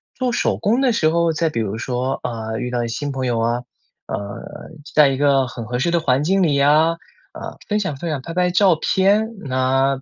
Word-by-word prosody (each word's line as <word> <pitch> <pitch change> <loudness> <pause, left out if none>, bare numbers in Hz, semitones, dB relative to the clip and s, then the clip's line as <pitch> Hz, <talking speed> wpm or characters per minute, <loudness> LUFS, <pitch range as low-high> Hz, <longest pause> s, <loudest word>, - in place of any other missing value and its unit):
做 250 -1 -1
手 - - 0
工 235 +6 +1
的 260 - +3
时 215 -9 +2
候 170 0 +2
再 160 0 0
比 115 -6 -2
如 105 0 -3
说， 125 +2 -2
啊， 110 -2 -4
遇 125 - -3
到 120 -1 -1
一 115 - -3
新 140 +4 -3
朋 130 -1 -3
友 120 -2 0
啊， 120 +2 0 0.5
呃， 100 0 -5 0.5
在 150 -2 +6
一 135 - 0
个 135 -1 +2
很 120 -1 -7
合 125 +2 -3
适 170 - +1
的 170 -1 +1
环 135 -1 +1
境 190 +2 +2
里 150 -4 +2
呀， 155 +4 +3 0.3
啊， - - -8
分 210 0 +1
享 185 -8 -2
分 165 +5 -5
享、 150 -4 -2
拍 165 +5 -7
拍 180 0 +1
照 185 -1 +4
片。 200 +7 +2 0.2
那 135 +1 +1
140 Hz, 240 characters per minute, -20 LUFS, 125-170 Hz, 0.5 s, 在